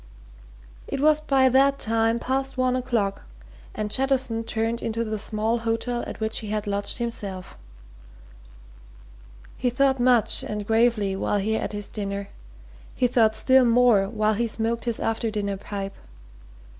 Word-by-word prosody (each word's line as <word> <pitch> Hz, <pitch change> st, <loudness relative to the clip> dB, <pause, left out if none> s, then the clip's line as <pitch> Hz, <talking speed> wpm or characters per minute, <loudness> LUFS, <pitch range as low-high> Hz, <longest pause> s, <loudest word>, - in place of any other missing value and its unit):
It -, -, -4 dB
was 305 Hz, +1 st, +4 dB
by 270 Hz, -3 st, +3 dB
that 275 Hz, +2 st, +4 dB
time 225 Hz, -1 st, +1 dB
past 265 Hz, +2 st, -2 dB
one 255 Hz, 0 st, +1 dB
o'clock, 235 Hz, -6 st, -1 dB, 0.5 s
and 210 Hz, -1 st, -3 dB
Jettison 260 Hz, -3 st, 0 dB
turned 230 Hz, +1 st, -2 dB
into 230 Hz, +1 st, -2 dB
the 215 Hz, -1 st, -3 dB
small 220 Hz, +2 st, 0 dB
hotel 230 Hz, +1 st, -2 dB
at -, -, -7 dB
which 220 Hz, 0 st, +1 dB
he 220 Hz, -, -7 dB
had 210 Hz, 0 st, -2 dB
lodged 200 Hz, 0 st, -1 dB
himself. 200 Hz, -6 st, -4 dB, 2.0 s
He 250 Hz, -, 0 dB
thought 265 Hz, +1 st, +1 dB
much 245 Hz, -3 st, +3 dB
and 210 Hz, -1 st, -5 dB
gravely 220 Hz, -3 st, +2 dB
while 205 Hz, -, -1 dB
he 210 Hz, +2 st, -1 dB
ate 220 Hz, -, -3 dB
his 205 Hz, -1 st, -3 dB
dinner; 200 Hz, -1 st, -5 dB, 0.7 s
he 250 Hz, -, +1 dB
thought 225 Hz, -3 st, +3 dB
still 260 Hz, +4 st, +4 dB
more 235 Hz, -5 st, +4 dB
while 215 Hz, -1 st, +1 dB
he 230 Hz, +3 st, -1 dB
smoked 230 Hz, +1 st, -2 dB
his 235 Hz, -2 st, -1 dB
after 225 Hz, 0 st, -1 dB
dinner 200 Hz, -2 st, -3 dB
pipe. 195 Hz, 0 st, -6 dB
225 Hz, 150 wpm, -24 LUFS, 210-245 Hz, 2.0 s, was